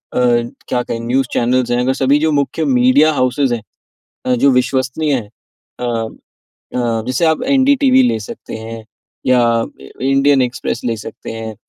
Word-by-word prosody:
क्या 120 Hz, 0 st, 0 dB
कहें 115 Hz, -, -4 dB
news 125 Hz, +3 st, 0 dB
channels 125 Hz, +1 st, +1 dB
हैं, 120 Hz, -, +2 dB
अगर 130 Hz, +1 st, +1 dB
सभी 135 Hz, +2 st, +2 dB
जो 160 Hz, +1 st, +1 dB
मुख्य 145 Hz, +3 st, 0 dB
मीडिया 130 Hz, +4 st, +4 dB
हॉउसेस 130 Hz, 0 st, +1 dB
हैं 115 Hz, -2 st, -1 dB, 0.6 s
अ, 125 Hz, -, +2 dB
जो 135 Hz, +3 st, +3 dB
विश्वसनीय 130 Hz, +4 st, 0 dB
हैं, 110 Hz, -5 st, -4 dB, 0.5 s
अ 125 Hz, -, -3 dB, 0.9 s
अ, 115 Hz, -2 st, 0 dB
जैसे 130 Hz, +6 st, 0 dB
आप 160 Hz, -1 st, +1 dB
एनडी 275 Hz, +1 st, +4 dB
टीवी 260 Hz, -1 st, +4 dB
ले 110 Hz, -, 0 dB
सकते 105 Hz, -, -8 dB
हैं 110 Hz, 0 st, -8 dB, 0.4 s
या 125 Hz, -1 st, +4 dB, 0.2 s
अ, -, -, -4 dB, 0.4 s
इंडियन 135 Hz, 0 st, +3 dB
एक्सप्रेस 125 Hz, -1 st, -3 dB
ले 115 Hz, -2 st, -1 dB
सकते 105 Hz, -, -9 dB
हैं 110 Hz, -1 st, -6 dB
125 Hz, 165 wpm, -17 LUFS, 120-140 Hz, 0.9 s, मीडिया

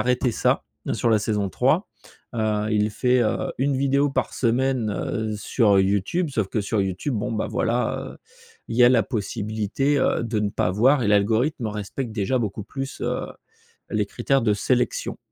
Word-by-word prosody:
arrêté 125 Hz, 0 st, +1 dB
ça -, -, +1 dB, 0.3 s
sur 120 Hz, -, 0 dB
la 110 Hz, -2 st, +4 dB
saison 105 Hz, -2 st, -1 dB
3. 95 Hz, -, +1 dB, 0.5 s
Heu, 110 Hz, -2 st, 0 dB
il 105 Hz, 0 st, +2 dB
fait, 125 Hz, +3 st, +2 dB
heu, 110 Hz, -, -1 dB
une 140 Hz, +1 st, +1 dB
vidéo 140 Hz, +1 st, +2 dB
par -, -, -2 dB
semaine, 125 Hz, -2 st, +1 dB
heu, 110 Hz, +1 st, -2 dB
sur 105 Hz, -1 st, +2 dB
YouTube 100 Hz, -, +1 dB
sauf 110 Hz, -7 st, -1 dB
que 110 Hz, -, -1 dB
sur 105 Hz, +1 st, -1 dB
YouTube, 95 Hz, +8 st, -2 dB
bon 105 Hz, 0 st, -2 dB
bah, 110 Hz, -, -1 dB
voilà, 120 Hz, +1 st, -1 dB
heu, -, -, -18 dB, 0.5 s
il 115 Hz, -, -5 dB
y 125 Hz, -, +6 dB
a 120 Hz, -, +8 dB
la 120 Hz, -4 st, +4 dB
possibilité, 110 Hz, +5 st, -1 dB
heu, 125 Hz, -, +1 dB
de 110 Hz, -2 st, -1 dB
ne 105 Hz, -, 0 dB
pas 90 Hz, -2 st, 0 dB
voir 125 Hz, +7 st, +4 dB
et 105 Hz, -, +1 dB
l'algorithme 110 Hz, +5 st, +2 dB
respecte 105 Hz, +4 st, -5 dB
déjà 105 Hz, +4 st, 0 dB
beaucoup 105 Hz, -1 st, -3 dB
plus, 135 Hz, +3 st, -6 dB
heu, -, -, -2 dB, 0.6 s
les -, -, 0 dB
critères 135 Hz, -2 st, 0 dB
de 105 Hz, -2 st, +2 dB
sélection. 125 Hz, +4 st, 0 dB
115 Hz, 180 wpm, -23 LUFS, 105-130 Hz, 0.6 s, a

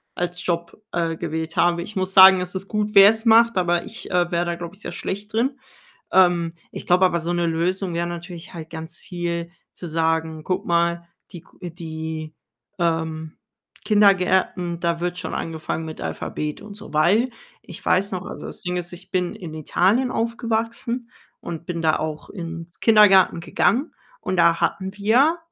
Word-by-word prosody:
als 175 Hz, 0 st, -3 dB
Job, 170 Hz, +3 st, -3 dB
äh, 165 Hz, -1 st, 0 dB
gewählt 160 Hz, 0 st, -4 dB
habe. 170 Hz, 0 st, +2 dB
Ich 210 Hz, +3 st, -10 dB
muss 190 Hz, 0 st, -2 dB
sagen, 190 Hz, -1 st, +9 dB
es 180 Hz, +1 st, -5 dB
ist 190 Hz, +1 st, -4 dB
gut, 210 Hz, 0 st, -2 dB
wer's 220 Hz, +4 st, +7 dB
macht, 230 Hz, 0 st, +6 dB
aber 175 Hz, -1 st, +1 dB
ich, 225 Hz, -, -8 dB
äh, 180 Hz, 0 st, +1 dB
wäre 175 Hz, 0 st, +1 dB
da, 170 Hz, 0 st, -2 dB
glaube 170 Hz, +1 st, -7 dB
ich, 200 Hz, -, -13 dB
sehr -, -, -6 dB
schlecht 205 Hz, +2 st, -5 dB
drin. 260 Hz, +4 st, 0 dB, 0.5 s
Ähm, 175 Hz, -3 st, +4 dB, 0.2 s
ich -, -, -8 dB
glaube 180 Hz, +1 st, +4 dB
aber, 170 Hz, -2 st, +1 dB
so 170 Hz, +2 st, -3 dB
'ne 175 Hz, -1 st, 0 dB
Lösung 175 Hz, +2 st, -1 dB
wäre 170 Hz, 0 st, 0 dB
natürlich 175 Hz, +1 st, -8 dB
halt 160 Hz, -1 st, -8 dB
ganz 160 Hz, +1 st, -7 dB
viel 170 Hz, -1 st, -4 dB, 0.2 s
zu 175 Hz, -, -8 dB
sagen: 160 Hz, -1 st, -1 dB
„Guck 185 Hz, -, -2 dB
mal, 170 Hz, 0 st, +1 dB, 0.2 s
die 175 Hz, -4 st, -9 dB
g 175 Hz, -2 st, -10 dB
die, 160 Hz, -2 st, -6 dB, 0.4 s
ähm, 160 Hz, -2 st, -1 dB, 0.5 s
Kindergärten, 190 Hz, -4 st, +3 dB
da 170 Hz, -1 st, -1 dB
wird 175 Hz, 0 st, -2 dB
schon -, -, -5 dB
angefangen 160 Hz, 0 st, -4 dB
mit 155 Hz, -, -8 dB
Alphabet 150 Hz, 0 st, -4 dB
und 205 Hz, -1 st, -10 dB
so.“ 210 Hz, -6 st, -11 dB
Weil 205 Hz, +11 st, +3 dB, 0.3 s
ich 175 Hz, -, -12 dB
weiß 195 Hz, +2 st, +2 dB
noch 185 Hz, 0 st, -4 dB
also, -, -, -8 dB
das -, -, -8 dB
Ding 180 Hz, 0 st, -2 dB
ist, 175 Hz, 0 st, -5 dB
ich 185 Hz, +2 st, -12 dB
bin 180 Hz, +2 st, -1 dB
in 175 Hz, -7 st, -8 dB
Italien 195 Hz, -, +1 dB
aufgewachsen 230 Hz, +1 st, -2 dB, 0.3 s
und 170 Hz, 0 st, -7 dB
bin 170 Hz, -2 st, -3 dB
da 155 Hz, -, +3 dB
auch 155 Hz, -1 st, -5 dB
ins 170 Hz, -1 st, -7 dB
Kindergarten 200 Hz, -6 st, +6 dB
gegangen. 255 Hz, -, +1 dB, 0.3 s
Und 185 Hz, -, -2 dB
da 170 Hz, 0 st, +4 dB
hatten 190 Hz, +2 st, -1 dB
wir 250 Hz, +11 st, +3 dB
175 Hz, 180 wpm, -22 LUFS, 165-195 Hz, 0.5 s, sagen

